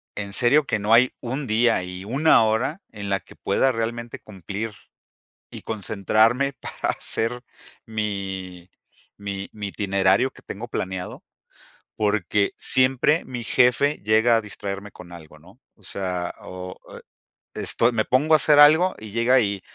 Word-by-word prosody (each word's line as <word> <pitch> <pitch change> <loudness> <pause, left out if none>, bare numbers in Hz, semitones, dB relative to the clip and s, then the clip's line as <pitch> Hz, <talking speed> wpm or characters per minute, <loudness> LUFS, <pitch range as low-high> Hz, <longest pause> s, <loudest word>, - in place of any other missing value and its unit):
en 100 -1 -5
serio 130 +7 +4
que 110 - -1
no 105 +2 +1
hay 125 +2 +5
un 130 +4 -4
día 115 -2 +2
y 90 +1 -8
una 135 +3 +4
hora 110 - -1
en 100 -2 -7
la 100 0 0
que - - -18
pueda 130 +7 +1
realmente 115 +1 -4
cumplir 100 +2 -7 0.8
y - - -10
concentrarme 110 +6 +1
para 130 - -4
hacer 120 +2 -2 0.4
mi 95 -4 -5 0.5
mi 100 -1 -5
mi 105 -1 -6
itinerario 100 +5 +1
que - - -16
tengo 110 +4 -7
planeado, 95 -5 -5 0.7
porque 105 -1 0
siempre 135 +4 +3
mi 120 -2 -6
jefe 125 +5 +2
llega 110 +2 +4
a - - +2
distraerme 100 -1 -7
con 90 -1 -13
algo, 80 -3 -13
¿no?, 95 +8 -19 0.2
o 105 - -28
sea, 90 -2 -4
o, 90 0 -9 0.2
eh - - -11 0.6
esto 120 +1 +2
me 110 -2 +1
pongo 140 +8 +2
a - - +8
hacer 150 0 +4
algo 160 +5 +6
y 110 -1 -10
llega 115 +4 +3
y: 100 -4 -1
110 Hz, 150 wpm, -23 LUFS, 100-125 Hz, 0.8 s, a